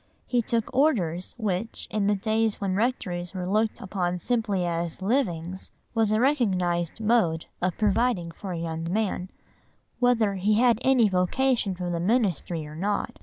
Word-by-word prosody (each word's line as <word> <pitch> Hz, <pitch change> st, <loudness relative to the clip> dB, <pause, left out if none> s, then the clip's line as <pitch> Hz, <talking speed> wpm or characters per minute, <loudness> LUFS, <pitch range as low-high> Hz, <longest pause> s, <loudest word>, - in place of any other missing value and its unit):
He 245 Hz, -1 st, +1 dB
took 230 Hz, 0 st, -2 dB
Orders 185 Hz, -, +1 dB
which, 215 Hz, -1 st, -3 dB
in 210 Hz, -2 st, 0 dB
the 205 Hz, -, +3 dB
days 220 Hz, +2 st, 0 dB
when 195 Hz, -2 st, -1 dB
rectories 190 Hz, -5 st, -1 dB
were 180 Hz, -1 st, -3 dB
looked 215 Hz, +4 st, 0 dB
upon 180 Hz, -2 st, -2 dB
simply 205 Hz, -2 st, 0 dB
as 170 Hz, -1 st, -2 dB
"livings," 190 Hz, -5 st, -1 dB, 0.2 s
was 225 Hz, -3 st, +2 dB
a 215 Hz, -, +3 dB
recognised 185 Hz, -, +1 dB
mode 210 Hz, -8 st, +2 dB, 0.2 s
of 180 Hz, -1 st, 0 dB
providing 210 Hz, -4 st, +1 dB
for 190 Hz, +3 st, -7 dB
a 175 Hz, -, -3 dB
young 165 Hz, 0 st, -3 dB
man, 195 Hz, -3 st, -1 dB, 0.7 s
whether 235 Hz, -5 st, +3 dB
he 205 Hz, +3 st, +2 dB
had 235 Hz, 0 st, +4 dB
any 260 Hz, -4 st, +4 dB
vocation 200 Hz, +3 st, +1 dB
for 175 Hz, -1 st, -3 dB
the 170 Hz, -, -1 dB
ministry 180 Hz, -, 0 dB
or 150 Hz, 0 st, -9 dB
not. 200 Hz, +5 st, -2 dB
200 Hz, 160 wpm, -26 LUFS, 175-225 Hz, 0.7 s, had